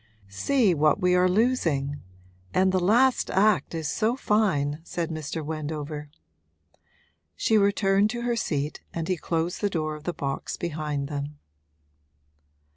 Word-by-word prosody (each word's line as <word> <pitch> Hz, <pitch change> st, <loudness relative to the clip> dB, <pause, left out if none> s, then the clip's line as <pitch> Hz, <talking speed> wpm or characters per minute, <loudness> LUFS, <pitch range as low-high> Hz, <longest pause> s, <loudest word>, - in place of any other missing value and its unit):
'See 205 Hz, -, +2 dB
what 150 Hz, -1 st, +3 dB
we 180 Hz, 0 st, +3 dB
are 180 Hz, 0 st, +4 dB
losing! 170 Hz, -, +1 dB, 0.5 s
And 190 Hz, 0 st, +4 dB
the 185 Hz, -, +2 dB
last 240 Hz, +8 st, +3 dB
act 200 Hz, -2 st, +2 dB
is 160 Hz, -2 st, -2 dB
so 225 Hz, -, +1 dB
fine,' 165 Hz, -, +1 dB
said 170 Hz, -1 st, -3 dB
Mr. 155 Hz, 0 st, -4 dB
Wendover. 150 Hz, -1 st, -5 dB, 1.3 s
She 220 Hz, -, +1 dB
returned 200 Hz, 0 st, +3 dB
to 235 Hz, +1 st, -4 dB
her 240 Hz, 0 st, 0 dB
seat 150 Hz, -8 st, -2 dB
and 165 Hz, -1 st, -2 dB
he 185 Hz, -, +1 dB
closed 165 Hz, +1 st, -2 dB
the 205 Hz, -, +1 dB
door 155 Hz, -4 st, -2 dB
of 150 Hz, 0 st, -10 dB
the 175 Hz, -, 0 dB
box 140 Hz, -3 st, -4 dB
behind 150 Hz, -4 st, -3 dB
them. 145 Hz, 0 st, -5 dB
170 Hz, 140 wpm, -26 LUFS, 150-200 Hz, 1.3 s, are